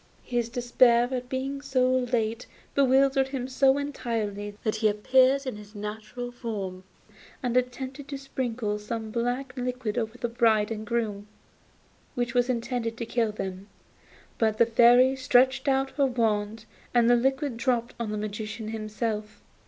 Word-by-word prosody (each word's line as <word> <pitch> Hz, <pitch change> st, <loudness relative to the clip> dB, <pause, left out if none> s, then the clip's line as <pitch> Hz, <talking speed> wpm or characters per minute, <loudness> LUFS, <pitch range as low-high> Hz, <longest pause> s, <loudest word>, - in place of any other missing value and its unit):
His 240 Hz, -2 st, -1 dB
despair 240 Hz, 0 st, +4 dB
at 250 Hz, -1 st, -3 dB
being 270 Hz, +1 st, -3 dB
so 265 Hz, -2 st, +1 dB
late 240 Hz, -2 st, -1 dB, 0.3 s
bewildered 270 Hz, 0 st, +4 dB
him 265 Hz, -2 st, -4 dB
so 265 Hz, +1 st, +3 dB
entirely 215 Hz, -7 st, -3 dB
that 215 Hz, -1 st, 0 dB
he 215 Hz, 0 st, +3 dB
appeared 260 Hz, +6 st, +3 dB
in 255 Hz, -5 st, -4 dB
his 210 Hz, +1 st, -13 dB
natural 215 Hz, +4 st, -6 dB
form 200 Hz, -6 st, -5 dB, 0.6 s
and 245 Hz, -1 st, -1 dB
attempted 260 Hz, +3 st, -2 dB
to 280 Hz, -1 st, -5 dB
sprinkle 240 Hz, -6 st, -3 dB
some 220 Hz, +1 st, -5 dB
black 245 Hz, +3 st, -2 dB
liquid 250 Hz, -3 st, -2 dB
over 225 Hz, +1 st, -4 dB
the 240 Hz, -, -2 dB
bride 225 Hz, -2 st, +2 dB
and 215 Hz, -1 st, -4 dB
bridegroom, 215 Hz, -4 st, -2 dB, 0.9 s
which 240 Hz, -2 st, -1 dB
was 245 Hz, 0 st, +2 dB
intended 235 Hz, -1 st, -2 dB
to 235 Hz, -, -3 dB
kill 225 Hz, -1 st, 0 dB
them, 195 Hz, -1 st, -6 dB, 0.7 s
but 220 Hz, -1 st, +2 dB
the 235 Hz, -, +6 dB
Fairy 245 Hz, +3 st, +5 dB
stretched 260 Hz, +1 st, +3 dB
out 270 Hz, 0 st, +2 dB
her 275 Hz, 0 st, +2 dB
wand 220 Hz, -3 st, -1 dB, 0.3 s
and 235 Hz, -1 st, +5 dB
the 245 Hz, -, +6 dB
liquid 265 Hz, +2 st, 0 dB
dropped 235 Hz, 0 st, 0 dB
on 230 Hz, -2 st, -2 dB
the 210 Hz, -, -3 dB
Magician 215 Hz, +1 st, -5 dB
himself. 215 Hz, 0 st, -4 dB
240 Hz, 150 wpm, -27 LUFS, 215-255 Hz, 0.9 s, the